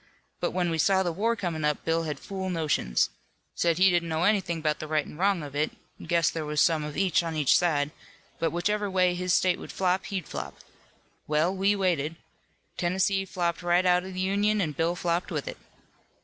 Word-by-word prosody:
But - - 0
when 180 -2 -1
we 165 - -1
saw 190 +3 +3
the 175 - -1
war 220 +7 0
comin' 170 -7 -3
up, 150 -1 0
Bill 165 0 +1
had 150 -3 -4
fool 190 -1 -5
notions. 150 - 0 0.4
Said 170 -2 +1
he 190 +1 +5
didn't 170 -1 +1
know 160 +1 0
anything 185 -5 +1
'bout 155 -1 -1
the 155 - -5
right 155 -1 0
an' - - -11
wrong 190 0 +1
of 145 -1 -8
it, 150 +2 0 0.3
guessed 170 -2 +2
there 160 - -3
was 150 0 -2
some 160 -1 +3
of 150 0 -6
each 190 -3 +3
on 165 -1 -4
each 150 -4 +4
side, 150 -4 +2 0.5
but 165 - +1
whichever 205 +4 -1
way 185 -1 +2
his 180 +1 -2
state 180 0 +3
would - - -8
flop, 185 0 0
he'd 190 -4 -4
flop. - - -6 0.7
Well, 155 +5 +1
we 195 +2 +2
waited. 165 -5 0 0.6
Tennessee 190 +2 +1
flopped 175 -2 -2
right 175 +1 +2
out 180 0 +4
of 190 0 -8
the - - -4
Union 205 +3 +1
an' 165 -6 0
Bill 165 +4 0
flopped 175 0 -1
with - - -3
it. - - -5
175 Hz, 210 wpm, -27 LUFS, 160-190 Hz, 0.7 s, he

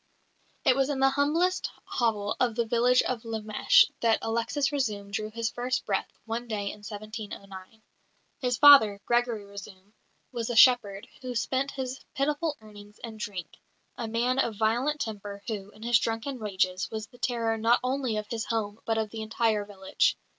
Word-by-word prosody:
It 255 - +5
was 270 +1 +1
in 280 -2 -1
the 270 0 +4
humblest 310 +7 +1 0.2
hovel 215 -3 -1
of 240 -3 +1
the 235 0 +1
village 245 +2 +3
of 250 -3 -2
Lemesh 220 -2 +3
that 230 -1 +3
Alexis 235 +5 0
Razoum 210 -8 -2
drew 215 +1 -3
his 230 0 -2
first 250 +1 -2
breath 195 -2 -1
one 230 +2 -4
day 205 -3 -2
in - - -11
1709. 210 -1 -9 0.6
His 250 -2 0
father, 255 -9 +8
Gregory 240 -3 +1
Razoum, 200 0 -12 0.4
was 235 -2 -3
a 240 - -2
shepherd, 225 -4 +5
who 250 -1 -5
spent 260 +4 0
his 260 -1 -5 0.2
pitiful 295 +2 0
earnings 210 -1 -14
in 225 -2 -7
drink 195 -5 -6 0.4
a 235 -3 -4
man 240 +4 0
of 230 -4 +1
violent 240 +8 +1
temper 205 -2 -5
who, 205 -3 -4
in 215 +1 -15
his 235 0 +4
drunken 230 +4 -3
rages, 190 -3 -1
was 220 -1 -5
the 245 +3 -20
terror 230 -2 0
not 230 +2 +4
only 255 -3 -1
of 210 - -3
his 225 -1 -3
home 220 -2 -2
but 225 -1 0
of 220 -2 -1
the 225 - -6
entire 220 -1 0
village. 205 - 0
225 Hz, 175 wpm, -28 LUFS, 210-250 Hz, 0.6 s, father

